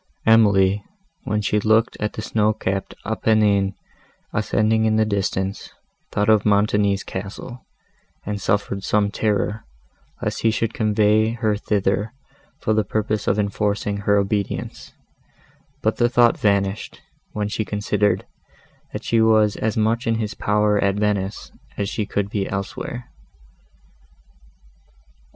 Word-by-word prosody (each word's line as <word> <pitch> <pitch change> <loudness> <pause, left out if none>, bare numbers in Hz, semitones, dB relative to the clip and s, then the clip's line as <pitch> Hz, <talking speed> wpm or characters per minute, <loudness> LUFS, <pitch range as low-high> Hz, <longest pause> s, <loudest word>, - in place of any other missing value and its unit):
Emily, 100 -3 +4 0.4
when 105 0 0
she 105 +1 +1
looked 110 +2 +2
at 105 0 -2
the 110 - -6
snow 110 -1 +1
capped 95 -2 -3
Apennines, 105 -2 +2 0.6
ascending 110 +1 +1
in 110 0 +2
the 110 0 +3
distance, 100 -1 -2 0.4
thought 105 - 0
of 110 -2 +4
Montoni's 100 -1 +2
castle, 100 +6 -7 0.6
and 105 0 -3
suffered 100 -2 -1
some 100 0 +1
terror, 105 0 -1 0.6
lest - - -3
he 115 - +3
should 115 0 -1
convey 110 0 +2
her 110 -3 0
thither, 105 +1 -1 0.5
for 110 - +1
the 110 0 +2
purpose 110 0 -2
of 100 - +2
enforcing 100 0 -1
her 100 0 +2
obedience; 100 0 -2 0.9
but - - +1
the 120 - +3
thought 120 -1 +4
vanished, 100 0 0 0.3
when 105 -1 -2
she 105 +1 -2
considered, 105 0 0 0.7
that - - -5
she 115 -1 +2
was 110 -2 +4
as 110 0 -2
much 115 +2 +1
in 115 - +2
his 110 -2 -2
power 105 0 +1
at 100 0 +2
Venice 105 -1 -2 0.3
as 100 - -1
she 105 -2 -3
could 100 -1 -1
be 100 -2 -2
elsewhere. 100 +5 -5
105 Hz, 135 wpm, -22 LUFS, 100-110 Hz, 0.9 s, Emily